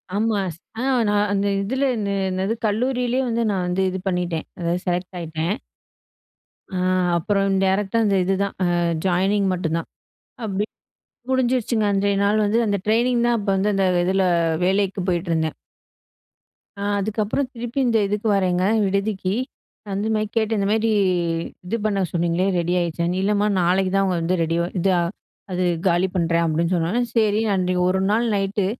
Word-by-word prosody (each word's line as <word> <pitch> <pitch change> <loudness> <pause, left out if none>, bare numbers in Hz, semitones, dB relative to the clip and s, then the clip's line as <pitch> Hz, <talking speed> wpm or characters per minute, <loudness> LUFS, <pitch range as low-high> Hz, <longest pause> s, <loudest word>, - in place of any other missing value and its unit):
ஆமா. 215 -1 +1 0.4
அ - - -2 0.3
நா 205 - +1 0.2
அந்த 200 0 +1
இதில 260 +7 -1
என்ன 205 -2 -2 0.2
என்னது 190 +4 -1
கல்லூரியிலே 250 +3 0
வந்து 235 0 0
நா 195 - -1
வந்து 180 +2 0
இது 190 0 -4
பண்ணிட்டேன். 175 -3 -1
அதாவது 175 +1 -1
செலக்ட் 180 +1 -2
ஆயிட்டேன். 160 0 -2 1.2
ஆ, - - -1 0.4
அப்புறம் 195 +2 +1
டைரக்ட்டா 195 +3 +1
அந்த 200 -1 +2
இதுதா. 195 +2 +1 0.2
ஆ - - +2 0.4
ஜாயினிங் 195 +2 +2
மட்டும்தான் 165 -2 -2 0.6
அப்படி 205 -1 -1 0.7
முடிஞ்சிருச்சுங்க. 245 -3 +1
அன்றைய 200 0 +1
நாள் 210 +1 +2
வந்து 220 +3 +2
அந்த 205 -1 +1
ட்ரெய்னிங் 235 +2 +2
தா, - - +3
அப்ப 205 - -7
வந்து 200 +2 +1
அந்த 195 - +2 0.2
இதுல 190 +1 +2 0.4
வேலைக்கு 195 0 +1
போயிட்டுருந்தேன். 165 -3 -1 1.2
அ - - -13 0.2
அதுக்கப்புறம் 215 +6 -1
திருப்பி 240 +2 -4
இந்த 235 -2 +3
இதுக்கு 210 +2 -2
வர்றேங்க, 185 -2 +1 0.2
விடுதிக்கு. 195 -1 -1 0.6
அந்த 200 +3 -1
மாரி 215 0 0
கேட்டு, 225 0 +1
இந்த 195 - 0
மாரி, 225 +1 +2 0.8
இது 225 - -2
பண்ண 205 -2 +1
சொன்னீங்ளே, 170 +2 +1
ரெடி 175 +1 0
ஆயிடுச்சான்னு. 170 +1 -1
இல்லம்மா 205 +1 +2
நாளைக்கு 185 +2 +2
தான் 195 - +3
அவங்க 185 -2 0
வந்து 175 +3 +1
ரெடி 165 +1 -1 0.2
இத 190 +3 +2 0.6
அது 180 0 0 0.2
காலி 175 +2 +3
பண்றேன், 170 -1 +1
அப்டின்னு 165 +3 0
சொன்னோனே 175 +9 0
சேரி 215 -1 +3
நான் 200 - +2
அன்னைக்கி 180 0 0
ஒரு 190 - +1
நாள் 230 +3 +2
நைட்டு 195 0 0
195 Hz, 150 wpm, -22 LUFS, 180-215 Hz, 1.2 s, தா